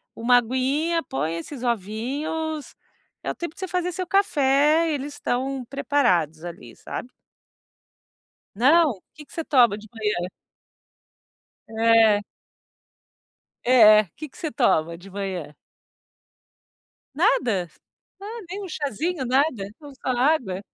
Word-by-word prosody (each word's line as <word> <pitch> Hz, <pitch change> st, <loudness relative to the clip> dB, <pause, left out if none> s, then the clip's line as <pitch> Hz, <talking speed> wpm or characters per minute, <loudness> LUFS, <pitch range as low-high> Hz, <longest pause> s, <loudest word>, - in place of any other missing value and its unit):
uma 245 Hz, +2 st, +4 dB
aguinha, 270 Hz, +8 st, 0 dB
põe 160 Hz, -, -3 dB
esses 250 Hz, -, -8 dB
ovinhos, 270 Hz, -, -3 dB, 0.5 s
é -, -, -3 dB
o -, -, -7 dB
tempo 340 Hz, -2 st, -5 dB
de -, -, -16 dB
você 375 Hz, -, -3 dB
fazer 360 Hz, 0 st, -1 dB
seu 365 Hz, +2 st, -4 dB
café, 310 Hz, -4 st, +3 dB
eles 285 Hz, +1 st, -4 dB
estão 260 Hz, +1 st, -2 dB
preparados 180 Hz, -, +1 dB
ali, 145 Hz, -9 st, -9 dB
sabe. 250 Hz, -, -7 dB, 1.5 s
Não? 280 Hz, -, +4 dB
Que 300 Hz, -, -12 dB
que -, -, -22 dB
você 330 Hz, -, -4 dB
toma 240 Hz, -7 st, +4 dB
de 215 Hz, -, -13 dB
manhã? 210 Hz, -5 st, -2 dB, 1.4 s
É. 225 Hz, -2 st, +4 dB, 1.4 s
É. 215 Hz, -4 st, +7 dB
Que 310 Hz, -, -7 dB
que -, -, -19 dB
você 315 Hz, -, -3 dB
toma 170 Hz, -, +1 dB
de 190 Hz, +3 st, -14 dB
manhã? 185 Hz, -6 st, -5 dB, 1.6 s
Nada? 195 Hz, -8 st, +2 dB, 0.5 s
Ah, 445 Hz, +3 st, -7 dB
nem 400 Hz, +2 st, -5 dB
um -, -, -5 dB
cházinho, 300 Hz, -, -2 dB
nada? 255 Hz, -5 st, +1 dB
então, 285 Hz, +8 st, -13 dB
só 260 Hz, -, -7 dB
água. 250 Hz, -7 st, +1 dB
255 Hz, 120 wpm, -24 LUFS, 210-310 Hz, 1.6 s, É